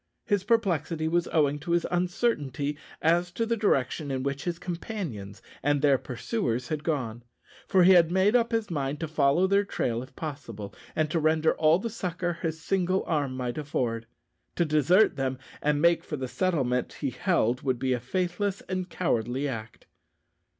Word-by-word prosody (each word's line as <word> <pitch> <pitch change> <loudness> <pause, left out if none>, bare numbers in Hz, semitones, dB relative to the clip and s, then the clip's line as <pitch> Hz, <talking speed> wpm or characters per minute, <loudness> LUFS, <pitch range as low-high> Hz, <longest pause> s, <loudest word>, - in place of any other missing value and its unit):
His 205 -3 +1
perplexity 175 -8 +1
was 170 +1 +1
owing 145 -2 +2
to 170 +3 -2
his 170 -1 +2
uncertainty 175 - 0 0.3
as 170 +2 +3
to 230 - 0
the 230 +1 0
direction 155 - 0
in 130 -1 -2
which 140 0 -3
his 175 -2 -2
companions 165 - -6 0.2
and 145 +1 +2
their 140 -3 +5
pursuers 125 - -2
had 155 -1 -2
gone; 125 -8 -2 0.5
for 185 -2 +5
he 185 - +7
had 170 -3 +6
made 190 +5 +3
up 235 -1 +3
his 225 -4 -1
mind 145 -2 -2
to 165 - -1
follow 150 +3 +3
their 200 +1 +3
trail 120 - -2
if 130 - -12
possible, 115 -10 -6 0.2
and 155 -1 0
render 160 -1 +3
all 155 +1 +4
the 230 +4 -4
succour 175 -5 -3
his 160 -2 -2
single 185 +2 0
arm 140 -5 -1
might 125 +1 -3
afford. 115 -6 -2 0.5
To 170 - +2
desert 155 +7 +4
them, 130 -1 -1 0.2
and 150 0 +1
make 170 +2 +4
for 150 - -5
the 130 -1 -3
settlement, 130 -7 0
he 140 -3 -3
held, 125 - +1
would 130 -2 0
be 130 +1 0
a 125 - -1
faithless 185 - -2
and 185 -1 -4
cowardly 130 -5 -1
act. 115 -4 -7
155 Hz, 175 wpm, -27 LUFS, 135-180 Hz, 0.5 s, he